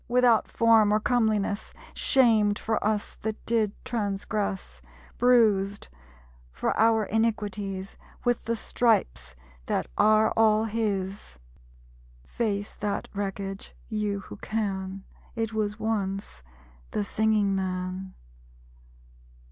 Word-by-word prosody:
Without 245 -2 +3
form 225 -2 +4
or 215 - +3
comeliness; 215 -3 0 0.2
Shamed 220 -6 +3
for 220 0 -1
us 210 -1 -1
that 220 0 -5
did 220 -3 +1
transgress; 200 - -3 0.4
Bruised, 215 -5 +3 0.6
for 60 - -1
our 225 0 +4
iniquities, 205 -3 -2 0.3
With 245 -1 +1
the 230 - 0
stripes 65 - 0 0.3
that - - 0
are 215 0 +5
all 220 -1 +4
his! 200 - -3 0.9
Face 205 - -2
that 205 -1 -3
wreckage, 195 -1 -5
you 210 -2 -2
who 105 - -10
can. 195 - -3 0.3
It 225 -1 -2
was 210 -1 -1
once 195 - -2 0.5
the 205 - -2
Singing 215 -2 +2
Man. 185 0 -3
210 Hz, 100 wpm, -27 LUFS, 195-220 Hz, 0.9 s, are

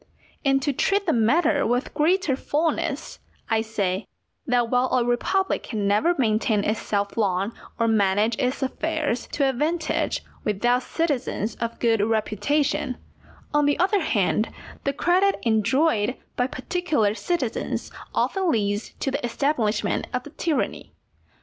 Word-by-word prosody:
And 270 -2 +2
to 285 - +1
treat 400 +9 +1
the 325 - +2
matter 285 +6 +3
with 245 +3 0
greater 325 -2 +2
fulness, 315 +1 -1 0.3
I 220 0 +3
say, 205 -3 -2 0.4
that 245 -2 +2
while 250 0 +3
a 250 -2 +2
republic 380 +11 +1
can 210 -4 -2
never 215 +13 +3
maintain 215 -4 +2
itself 205 -1 -1
long, 200 0 +1 0.2
or 230 - +2
manage 210 +1 +2
its 260 +1 0
affairs 300 -2 -1
to 280 - +2
advantage, 310 +5 0 0.2
without 240 +5 +1
citizens 265 -8 -1
of 230 0 -3
good 230 -2 +2
reputation, 235 +6 0 0.6
on 295 -1 +3
the 290 - +2
other 390 +2 +2
hand 215 - +1 0.4
the 275 - +1
credit 370 +6 +3
enjoyed 230 +1 +2 0.2
by 245 - +1
particular 265 - 0
citizens 265 -1 -2 0.2
often 380 -2 +1
leads 205 -2 -1
to 270 - 0
the 280 +1 -3
establishment 235 -4 0
of 250 - -3
a 295 - -10
tyranny. 315 0 -2
250 Hz, 135 wpm, -24 LUFS, 220-300 Hz, 0.6 s, matter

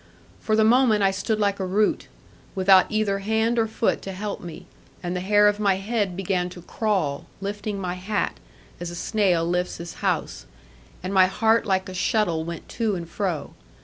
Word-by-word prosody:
For 215 - 0
the 220 - +4
moment 225 -2 +4
I 195 - +4
stood 215 +3 -1
like 200 -1 +1
a - - -1
root, 205 +3 +1 0.5
without 190 -1 +5
either 215 -2 +1
hand 220 +3 +1
or 225 - +2
foot 220 +1 0
to 195 - -6
help 200 +2 -5
me, 170 -3 -9 0.4
and 175 +1 -2
the - - -1
hair 205 +3 +4
of 205 0 +1
my 200 -2 +3
head 200 -2 -2
began 185 -2 -1
to 175 -1 -11
crawl, 185 -10 -1
lifting 205 +1 -4
my 180 -2 -2
hat, 190 +3 -2 0.4
as 175 - -4
a 175 - -7
snail 180 -3 +1
lifts 180 +1 -1
his 170 +1 -7
house; - - -2 0.6
and 185 +2 -3
my 190 -1 +6
heart 220 +4 +2
like 190 0 +1
a 185 - -7
shuttle 180 -3 +1
went 170 0 -7
to 220 -3 -1
and 170 -2 -6
fro. 180 -8 -3
195 Hz, 190 wpm, -24 LUFS, 180-215 Hz, 0.6 s, my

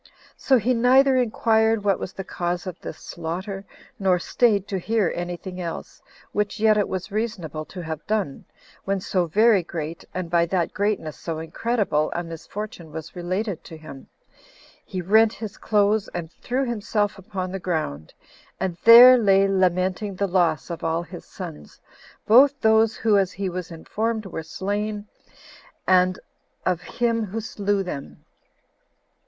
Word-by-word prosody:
So 265 - +3
he 245 +3 +1
neither 260 +3 +5
inquired 225 -2 +2
what 200 -2 +2
was - - -5
the 190 - -7
cause 175 -1 -3
of 185 -3 -6
this - - -7
slaughter, 185 +4 -6 0.3
nor 190 -2 +3
staid 205 +1 +1
to 195 - -1
hear 215 0 +1
any 175 0 -4
thing 185 0 -7
else, 170 -1 -6 0.3
which 210 +1 -2
yet 215 0 +5
it 205 -1 +1
was 185 +1 -4
but 205 - -8
reasonable 175 -9 -3
to 180 - -8
have 160 -1 -6
done, 205 -10 -2 0.4
when 195 0 -1
so 180 -1 0
very 215 +3 +4
great, 165 -1 -6
and 185 -1 -4
by 170 0 +2
that 175 -1 -1
greatness 200 -7 -1
so 165 -2 -4
incredible, 160 -1 -1
a 175 - -1
misfortune 170 +1 -8
was 160 +2 -8
related 185 +2 -3
to 160 - -10
him: 145 -4 -11 0.8
he 185 -1 -5
rent 220 +4 +4
his 215 -3 -7
clothes 210 0 +2
and 170 -2 -5
threw 260 +8 -2
himself 210 -3 -1
upon 185 -1 -5
the 195 - -4
ground, 155 - -3 0.5
and 185 -3 -2
there 245 +2 +10
lay 195 -2 +4
lamenting 185 +1 0
the 200 - 0
loss 175 -3 +1
of 170 - -6
all 165 +1 0
his - - -10
sons, 75 -1 -9 0.5
both 270 +5 +6
those 220 0 +4
who, 210 -3 +3
as 190 -1 0
he 195 0 -3
was 180 0 -5
informed, 215 +6 -3
were 170 -4 -5
slain, 205 +5 -3 0.8
and 185 0 +4 0.5
of 180 -2 0
him 230 +4 -1
who 210 +3 -4
slew 205 -2 -1
them. 145 -7 -8
195 Hz, 160 wpm, -24 LUFS, 175-215 Hz, 0.8 s, there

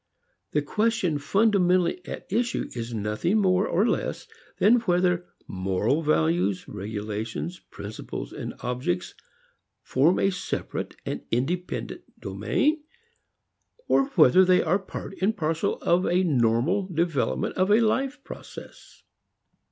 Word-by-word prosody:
The 150 - +2
question 210 -4 0
fundamentally 180 0 +2
at - - -6
issue 235 +1 0
is 115 -1 -5
nothing 110 - 0
more 190 -1 +3
or 200 +7 +2
less - - -2 0.3
than 235 +4 +5
whether 180 -4 +1 0.2
moral 95 - 0
values, 90 - +1
regulations, 110 - -5
principles 105 +2 -7
and - - -6
objects 120 -8 -2 0.7
form 150 +8 +3
a 195 - +2
separate 180 - -4
and - - -3
independent 165 +10 -2 0.2
domain 305 +1 0 1.0
or 270 - +4
whether 165 +2 +7
they 185 0 +4
are 180 +4 +2
part 195 0 -7
and 210 +3 +1
parcel 160 -1 0
of 175 +2 +2
a 180 +2 +2
normal 140 - +2
development 160 - -1
of 185 +1 +1
a 210 +2 +6
life 270 +5 0
process. - - -11
175 Hz, 120 wpm, -26 LUFS, 120-195 Hz, 1.0 s, whether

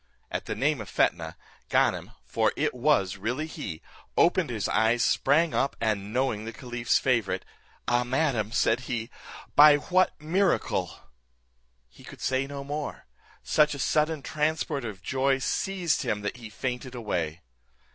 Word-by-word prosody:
At - - -3
the - - -3
name 145 -2 +1
of 105 - -8
Fetnah, 80 -1 0 0.3
Ganem - - +1
(for - - +1
it - - 0
was 125 -8 +2
really 120 +10 -2
he) 125 - -7 0.3
opened 175 -3 +3
his 110 -4 -2
eyes, 115 +1 +2
sprang 150 +9 +3
up, 140 - 0
and 105 -3 -1
knowing 125 -3 0
the 115 - -5
caliph's 120 0 0
favourite; 110 -8 0 0.4
"Ah! 120 0 +3
madam," 125 -4 0
said 115 0 +2
he, 120 -1 -3 0.4
"by 145 0 +9
what 185 +5 +1
miracle" 180 +6 0 0.9
He 65 - -18
could - - -12
say 130 +1 0
no 140 0 -6
more; 145 +1 -5 0.4
such 150 -1 +3
a - - -6
sudden 150 +2 +1
transport 150 -3 -1
of 100 -4 -7
joy 135 +3 +1
seized 180 +5 0
him 105 - -1
that 105 +4 -4
he 115 -3 -9
fainted 125 +3 -4
away. 90 -8 -3
130 Hz, 150 wpm, -27 LUFS, 110-150 Hz, 0.9 s, by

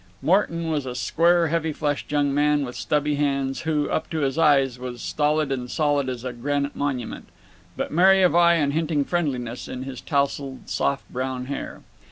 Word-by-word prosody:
Morton 170 -3 +1
was 145 -4 -1
a 125 - -5
square 170 +5 +2
heavy 160 0 0
fleshed 145 -1 -3
young 145 -1 +1
man 145 0 +2
with 125 - -8
stubby 150 -1 0
hands, 140 -2 0
who, 155 -2 0
up - - -1
to 160 -2 -2
his 135 -2 0
eyes, 135 -6 +3
was 125 -1 -6
stolid 150 +2 0
and 125 -2 -3
solid 145 -2 +1
as 125 -2 -5
a 130 -1 -4
granite 140 +4 -2
monument, 135 -5 -3 0.5
but - - -3
merry 190 +4 +5
of 180 - +4
eye 170 0 +6
and 145 -4 +1
hinting 155 -2 0
friendliness 130 -9 -2
in 130 - -6
his 130 -2 -7
tousled 140 -2 -2
soft 140 0 -1
brown 130 0 -3
hair. 140 +2 -6
145 Hz, 185 wpm, -24 LUFS, 135-155 Hz, 0.5 s, eye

